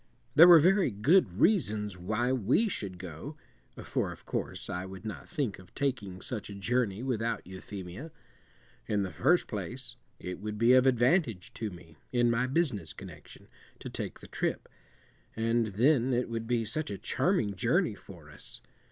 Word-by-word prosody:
There 165 +4 +9
were 175 -1 +10
very 185 +2 +4
good 115 - +3
reasons 105 - +2
why 110 +7 -1
we 130 - +2
should 100 - -4
go 90 - -8 0.5
(for - - -1
of - - -12
course - - -4
I 90 +1 -3
would 95 +2 -9
not 110 - -7
think 140 - -2
of 95 -2 -17
taking 105 -10 -2
such 110 -5 -5
a 100 - -7
journey 115 +1 0
without 115 -3 -1
Euphemia). 95 - -8 0.8
In 105 -2 +1
the 95 - -4
first 175 +7 +2
place, 120 +5 -4 0.2
it 90 0 -6
would 105 0 -5
be 115 +3 +5
of 130 +1 +6
advantage 125 - +2
to 110 - -3
me, 85 -3 -14
in 120 -1 +3
my 120 +2 +1
business 130 - -1
connection, - - -12 0.3
to - - -8
take - - -5
the - - -11
trip, - - -2 0.7
and 115 0 +1
then 125 +4 +3
it 125 0 0
would 115 -1 -4
be 120 -2 +1
such 150 +8 -3
a 100 - -4
charming 130 - 0
journey 90 - +2
for - - -13
us. - - -8
115 Hz, 170 wpm, -30 LUFS, 100-130 Hz, 0.8 s, were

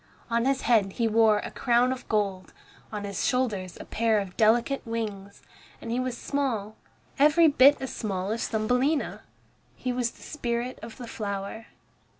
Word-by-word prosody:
On 235 +1 +2
his 270 0 +1
head 210 -5 +3
he 230 -2 0
wore 220 -1 +4
a - - -5
crown 245 +1 +2
of 260 0 -6
gold, 200 -3 -1 0.4
on 210 -2 -4
his 200 -1 -3
shoulders 210 -8 -1
a - - -8
pair 225 -1 +1
of 195 -3 -3
delicate 235 +5 +3
wings, 210 -4 -5 0.4
and 230 - -6
he 240 - 0
was 255 -1 -2
small, 235 -8 -2 0.4
every 305 +3 +6
bit 285 0 +6
as 265 -2 -5
small 195 -2 -3
as 225 +1 -1
Thumbelina. 250 +7 0 0.5
He 250 -1 -3
was 245 -1 0
the - - -17
spirit 245 -3 -3
of 225 0 -9
the 245 - -7
flower. 200 0 -5
230 Hz, 165 wpm, -27 LUFS, 210-255 Hz, 0.5 s, every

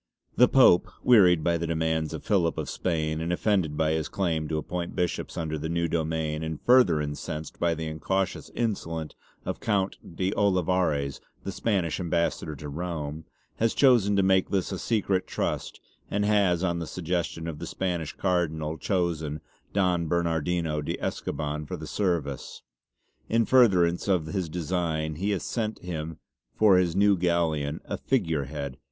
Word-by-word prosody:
The 125 - +6
Pope, 125 -10 +6 0.2
wearied 90 -9 +6
by 85 0 +1
the 85 - -2
demands 80 -1 0
of - - -6
Philip 85 -5 +1
of - - -3
Spain 80 -3 -1
and 85 +2 -2
offended 90 -5 +1
by 80 0 +2
his 80 -1 -1
claim 80 -5 -1
to 80 - -2
appoint 85 +2 -4
bishops 90 -1 -2
under 80 -1 -2
the 80 +2 -4
new 85 0 0
domain 80 -1 -1
and 80 -1 -4
further 120 -11 +5
incensed 75 +1 -5
by 85 -1 +2
the 80 0 -4
incautious 90 +4 -2
insolence 80 -9 -2 0.3
of - - -3
Count 100 -3 0 0.2
de 95 +2 0
Olivares 90 -7 +1 0.2
the 95 - -4
Spanish 95 -5 -1
ambassador 85 -3 -1
to 75 +2 -8
Rome, 75 -1 -4 0.3
has 115 0 +1
chosen 120 -7 +5
to 100 - +3
make 95 0 +3
this 95 -2 0
a 95 - -3
secret 100 -5 0
trust - - -3 0.3
and 105 0 0
has 100 -4 +3
on 85 -2 0
the 85 - -4
suggestion 85 -1 -3
of 75 -3 -5
the - - -5
Spanish 85 -5 -2
Cardinal 80 -4 -1
chosen 80 -6 -1 0.3
Don 90 -4 +1
Bernardino 85 -1 0
de 75 - -3
Escoban 75 0 -3
for - - -4
the - - -7
service. 85 -9 -2
85 Hz, 130 wpm, -27 LUFS, 80-95 Hz, 0.3 s, The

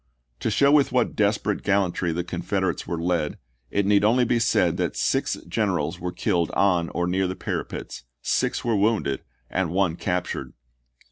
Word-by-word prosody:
To - - -1
show 140 +6 +4
with 145 -2 +4
what 125 -1 +1
desperate 105 -1 +1
gal 100 0 +3
lantry 90 -1 -2
the 85 +2 -2
Confederates 90 0 -2
were 85 - -2
led, 85 -3 -1 0.3
it 100 -1 0
need 100 0 +4
only 120 +4 +4
be 120 +1 +2
said 115 - +2
that - - -1
six - - +1
generals 80 +5 -1
were 90 -1 -3
killed 85 -1 0
on 90 -4 +2
or 90 +1 -1
near 95 +2 +1
the 95 - -3
parapets, - - -5 0.2
six - - 0
were 115 -2 +2
wounded, 100 -10 +1 0.3
and 95 -3 -1
one 90 -1 +1
captured. 90 +1 -3
95 Hz, 175 wpm, -24 LUFS, 85-105 Hz, 0.3 s, show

